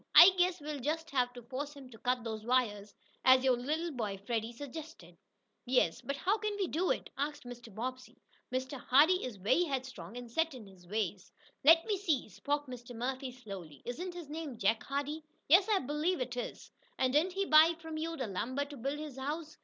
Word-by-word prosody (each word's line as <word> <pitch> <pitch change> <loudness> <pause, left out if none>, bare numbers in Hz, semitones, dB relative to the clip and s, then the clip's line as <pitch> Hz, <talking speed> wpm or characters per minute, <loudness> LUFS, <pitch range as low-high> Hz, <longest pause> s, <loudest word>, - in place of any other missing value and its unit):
I 360 - +12
guess 360 0 +3
we'll 295 -1 -5
just 320 +5 -2
have 250 -3 +2
to 245 - -10
force 280 +4 -5
him 265 -3 -12
to 225 - -13
cut 250 -1 0
those 220 -2 -4
wires, 215 -4 0 0.3
as 260 0 +7
your 260 -2 +4
little 310 +7 -2
boy, 215 -7 -3
Freddie, 225 0 -1
suggested." 290 +6 -9 0.5
"Yes, 250 -10 +2
but 280 - -3
how 400 +9 +1
can 425 -1 -2
we 395 -2 0
do 350 +4 0
it?" - - -1
asked 290 +1 -2
Mr. 240 -2 -10
Bobbsey. 255 +5 -6 0.3
"Mr. 260 +1 -2
Hardee 305 +10 +5
is 250 -4 -4
very 215 - +2
headstrong, 260 - -5
and 245 -1 -8
set 325 +2 +1
in 235 -4 -9
his 185 -3 -16
ways." 200 -2 -2 0.3
"Let 330 +3 +7
me 420 -2 0
see," 310 - 0
spoke 290 +9 -2
Mr. 245 -2 -9
Murphy 260 +3 -3
slowly, 195 - -10
"isn't 350 +9 -4
his 345 -4 -7
name 300 -4 -5
Jake 220 +2 +2
Hardee?" 285 +3 -3 0.2
"Yes, 365 +7 +7
I 420 - +4
believe 305 +4 0
it 250 -1 -3
is." 245 - -6 0.3
"And 260 0 +1
didn't 335 +5 +3
he 390 +1 0
buy 320 0 +7
from 320 -1 -7
you 330 +1 -3
the 260 - -2
lumber 250 +8 -2
to 285 0 -10
build 275 +4 -2
his 300 -3 -7
house?" 305 +3 -4
265 Hz, 205 wpm, -33 LUFS, 240-315 Hz, 0.5 s, I